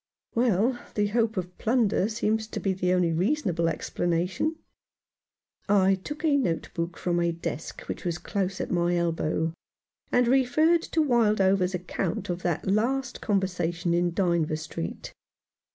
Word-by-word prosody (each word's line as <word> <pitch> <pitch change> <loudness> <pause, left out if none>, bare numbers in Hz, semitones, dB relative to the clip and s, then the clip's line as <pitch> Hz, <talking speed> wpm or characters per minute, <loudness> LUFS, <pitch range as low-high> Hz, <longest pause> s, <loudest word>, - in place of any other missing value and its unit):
"Well, 235 +1 +2 0.2
the 205 -1 +1
hope 225 -1 +1
of 180 -1 -4
plunder 225 -4 +2
seems 220 0 0
to - - -5
be 195 - 0
the 180 -1 0
only 180 -2 +2
reasonable 180 - +1
explanation." 175 - -1 1.1
I 195 -1 +5
took 295 - -5
a 300 -3 +4
notebook 170 -6 -2
from 175 -1 0
a 170 0 +2
desk 165 -1 -5
which - - -6
was 175 -2 -1
close 195 0 -2
at - - -3
my 175 0 +2
elbow, 165 -1 0 0.6
and 245 -1 +3
referred 305 +7 +4
to 325 - 0
Wildover's 195 -7 +3
account 180 0 -3
of 175 +1 -4
that 175 -2 -1
last 245 +6 0
conversation 180 -4 0
in 175 0 +2
Dynevor 170 -4 +1
Street. 155 - -6
190 Hz, 140 wpm, -27 LUFS, 175-230 Hz, 1.1 s, I